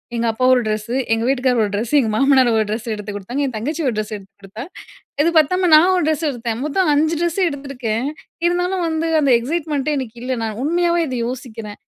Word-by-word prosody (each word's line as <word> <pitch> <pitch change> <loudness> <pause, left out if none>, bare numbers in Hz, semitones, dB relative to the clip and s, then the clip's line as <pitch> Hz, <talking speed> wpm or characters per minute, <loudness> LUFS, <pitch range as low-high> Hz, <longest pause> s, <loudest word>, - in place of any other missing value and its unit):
எங்க 235 0 0
அப்பா 225 +3 -1
ஒரு 250 - +3
ட்ரெஸ்ஸு, 215 +2 -2 0.2
எங்க 225 0 0
வீட்டுக்காரர் 255 -2 +1
ஒரு 205 - -2
ட்ரெஸ்ஸு, 220 +6 -3
எங்க 235 -5 +1
மாமனாரு 265 0 +4
ஒரு 220 - +3
ட்ரெஸ் 220 +2 -4
எடுத்து 210 -1 -6
கொடுத்தாங்க. 235 +8 -4
என் 260 - -3
தங்கச்சி 290 +10 -3 0.2
ட்ரெஸ் 215 0 -3
எடுத்து 195 -1 -12
கொடுத்தா. 200 +4 -8 0.6
இது 335 - +3
பத்தாம 360 +4 +2
நான் 325 +4 +7
ஒரு 360 - +1
ட்ரெஸ் 315 0 0
எடுத்தேன். 235 -3 -4
மொத்தம் 355 +5 +1
5 315 +3 +2
ட்ரெஸ்ஸு 345 +2 0
எடுத்துருக்கேன். 265 -5 -3 0.4
இருந்தாலும் 355 +1 0
வந்து 325 0 -1
அந்த 280 -2 +2
எக்ஸைட்மெண்ட்டே 300 +2 -2
எனக்கு 245 -4 -6
இல்ல. 255 +1 -2
நான் 220 -2 -3
உண்மையாவே 340 +3 +1
இத 255 - -3
யோசிக்றேன். 225 -4 -7
260 Hz, 195 wpm, -19 LUFS, 225-315 Hz, 0.6 s, நான்